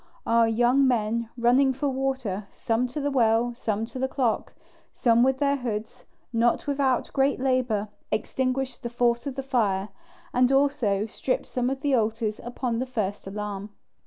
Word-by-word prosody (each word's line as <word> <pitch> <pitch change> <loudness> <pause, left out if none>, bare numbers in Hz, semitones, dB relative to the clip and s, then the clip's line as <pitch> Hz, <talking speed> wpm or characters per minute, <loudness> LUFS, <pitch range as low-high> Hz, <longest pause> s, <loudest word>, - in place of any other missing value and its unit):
Our 230 0 +4
young 240 +4 +3
men, 230 -1 0
running 255 +3 +4
for 285 +3 -2
water, 260 -7 -2
some 230 +2 0
to 255 +5 -5
the 285 0 -1
well, 235 -2 +2
some 220 -2 -2
to 255 - -8
the 265 - +1
clock, 255 -4 -1 0.4
some 235 -1 +4
with 265 +1 +3
their 280 0 +2
hoods, 220 -4 -5 0.3
not 230 +1 +2
without 275 -3 0
great 270 0 +2
labour, 255 -5 +1 0.2
extinguished 255 +3 -1
the 235 - -4
force 240 +1 +1
of 270 - -4
the 270 - -3
fire, 210 -7 0 0.4
and 250 +1 +3
also 270 -8 +2
stripped 255 +4 -2
some 250 0 -1
of 270 0 -3
the 285 -2 +1
altars 225 -2 0
upon 240 -1 -2
the 260 - -2
first 205 -6 -3
alarm. 205 0 -5
245 Hz, 165 wpm, -26 LUFS, 225-265 Hz, 0.4 s, Our